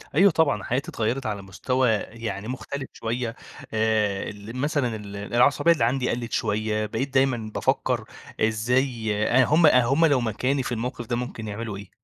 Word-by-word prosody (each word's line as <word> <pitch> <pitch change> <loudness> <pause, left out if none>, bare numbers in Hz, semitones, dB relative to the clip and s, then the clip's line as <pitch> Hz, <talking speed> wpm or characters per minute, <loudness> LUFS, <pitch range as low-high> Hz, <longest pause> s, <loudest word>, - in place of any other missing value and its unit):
أيوه، 195 +4 +6
طبعًا. 145 - +2
حياتي 130 +7 -2
اتغيرت 120 +4 -1
على 105 -2 -2
مستوى 125 +6 0
يعني 110 -1 -4
مختلف 135 +2 -5
شوية 115 +1 -3 0.4
آآ، 110 -3 +1
ال 105 +3 -9
مثلًا 135 -4 0
ال 100 -2 -8
العصبية 120 +10 +3
اللي 160 -8 +2
عندي 125 +2 +1
قَلِّت 120 -1 -3
شوية، 110 0 0
بقيت 130 +6 -3
دايمًا 130 -5 +1
بافكر - - 0 0.4
إزاي 115 +1 +1 0.2
آآ، 130 +1 +5
هم 160 +5 +4
هم 135 +3 +5
لو 140 -5 +3
مكاني 125 +5 0
في - - -4
الموقف 120 +1 -3
ده 120 - -1
ممكن 120 -2 -5
يعملوا 105 0 -5
إيه؟ 100 0 -10
120 Hz, 165 wpm, -25 LUFS, 110-130 Hz, 0.4 s, أيوه